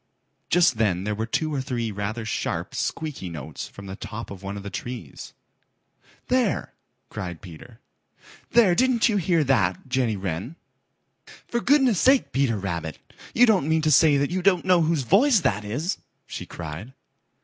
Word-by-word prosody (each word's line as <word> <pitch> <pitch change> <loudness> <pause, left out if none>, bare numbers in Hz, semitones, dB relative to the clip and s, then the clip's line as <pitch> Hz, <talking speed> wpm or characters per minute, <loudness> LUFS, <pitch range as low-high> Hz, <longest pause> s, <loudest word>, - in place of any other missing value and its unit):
Just 165 -10 +3
then 95 -5 +1
there 105 +1 -1
were 110 +2 -3
two 155 +6 -1
or 140 - -1
three 120 -4 -3
rather 105 +3 -4
sharp, - - -3
squeaky 150 - -3
notes 75 -2 -7
from 100 - -12
the 95 0 -6
top 115 +1 -7
of 95 -2 -9
one 100 +1 -5
of 100 - -8
the 100 - -7
trees. 125 -1 -7 0.9
"There!" 250 - 0 0.4
cried 90 -6 -6
Peter. 95 +7 -13 0.7
"There! 225 -6 +5
Didn't 250 +4 +3
you 210 - +1
hear 170 -3 +2
that, 115 -8 +1
Jenny 125 -4 0
Wren?" 95 - -4 0.9
"For 235 - -1
goodness' 260 - +4
sake, 265 0 +4
Peter 130 -5 +1
Rabbit, 85 -6 -4 0.4
you 245 - +7
don't 195 - +2
mean 160 0 +2
to 155 - +2
say 150 +1 +6
you 140 +7 0
don't 180 -2 +3
know 180 -2 +4
whose 160 -3 +1
voice 220 - +4
that 105 -8 0
is," 145 - -3 0.3
she - - -7
cried. 85 +9 -7
130 Hz, 165 wpm, -24 LUFS, -, 0.9 s, you